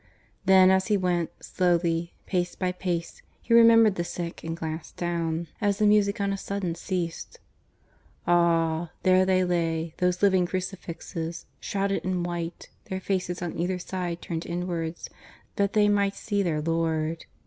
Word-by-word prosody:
Then, 190 0 +7
as 190 0 +2
he 210 -2 +3
went, 175 -3 0
slowly, 170 -2 0
pace 180 -2 -1
by 185 -1 -1
pace, 175 -2 -3 0.2
he 230 - -1
remembered 230 -2 +7
the 175 - -2
sick 170 -1 -5
and 165 0 -4
glanced 160 -1 -6
down, 170 -1 -1 0.2
as 205 -2 +2
the 215 - +2
music 205 -1 +3
on 200 0 0
a - - -2
sudden 200 -4 -3
ceased. 170 0 -4 0.9
Ah! 170 -1 +2
there 185 0 +4
they 185 -1 +3
lay, 165 -2 -1
those 180 +1 +1
living 190 -3 +4
crucifixes.... 175 -3 -5
shrouded 195 0 -1
in 185 -1 -1
white, 175 -1 -5
their 190 - -4
faces 185 -2 -2
on 175 - -4
either 180 +2 -1
side 180 -1 -4
turned 165 -1 -4
inwards 170 -1 -3 0.5
that 200 0 +1
they 210 -1 +4
might 200 -1 +2
see 205 -2 -1
their 160 -5 0
Lord. 165 0 -1
180 Hz, 155 wpm, -26 LUFS, 170-190 Hz, 0.9 s, Then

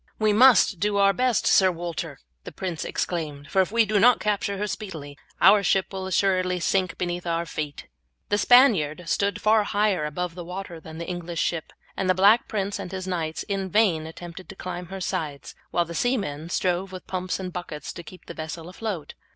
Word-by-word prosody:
"We 215 -1 +2
must 230 -5 +6
do 205 +2 +1
our 200 0 +5
best, 250 +3 +1
Sir 190 -1 +5
Walter," 170 -1 -5 0.3
the - - -8
prince 180 -4 -4
exclaimed, 150 -4 -4
"for 190 - +4
if 190 - -1
we 230 0 +4
do 210 0 +1
not 245 +3 +6
capture 200 -1 -1
her 205 - -1
speedily 165 -9 -6 0.2
our 200 +1 +7
ship 195 0 +1
will 190 -1 -4
assuredly 185 -1 +1
sink 185 0 0
beneath 175 0 -3
our 170 0 0
feet." 150 -2 -5 0.4
The 205 - +2
Spaniard 200 - +5
stood 200 +3 0
far 215 0 +4
higher 205 -5 +1
above 175 +3 -3
the 175 0 -7
water 180 -1 -7
than 160 0 -11
the 170 - -6
English 175 -2 -3
ship, 165 -2 -3 0.2
and 190 - -1
the 185 - +4
Black 205 +5 +5
Prince 200 -1 -2
and 180 - -6
his 190 -1 -5
knights 165 -4 -3
in 195 -2 -3
vain 175 -6 +2
attempted 175 +2 -10
to 190 - -9
climb 180 -1 -6
her 190 +1 -7
sides, 145 -7 -4 0.2
while 175 - +1
the 170 - -8
seamen 170 - -1
strove 180 +1 -1
with 185 -1 -9
pumps 185 0 -3
and 185 -2 -5
buckets 155 -5 -6
to - - -8
keep 180 +2 -14
the - - -8
vessel 160 +1 -7
afloat. 185 -5 -5
185 Hz, 200 wpm, -25 LUFS, 170-200 Hz, 0.4 s, our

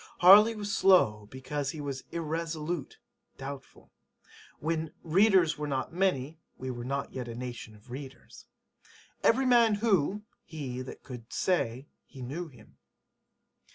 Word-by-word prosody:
Harley 210 +5 +8
was 205 -1 -3
slow 105 - +4
because 135 +2 -4
he 155 - -6
was 140 -2 -5
[irresolute] 165 -1 -3 0.4
doubtful. 135 0 -9 0.7
When 160 0 -2
[readers 180 -2 +4
were 150 - -2
not 135 +2 -2
many] 165 -5 0 0.2
we 130 0 -4
were 120 -1 -6
not 140 +2 -3
yet 125 -2 -5
a 115 - -6
nation 120 -3 -7
of 105 +4 -17
readers. 135 +1 -10 0.8
[Every 260 +3 +4
man 235 -4 +5
who] 205 -2 +1 0.2
he 135 -6 -6
that 130 - -9
could 120 -3 -10
say 135 -8 0 0.2
he 130 -3 -10
knew 160 +8 -5
him. 125 -8 -18
150 Hz, 135 wpm, -29 LUFS, 130-180 Hz, 0.8 s, Harley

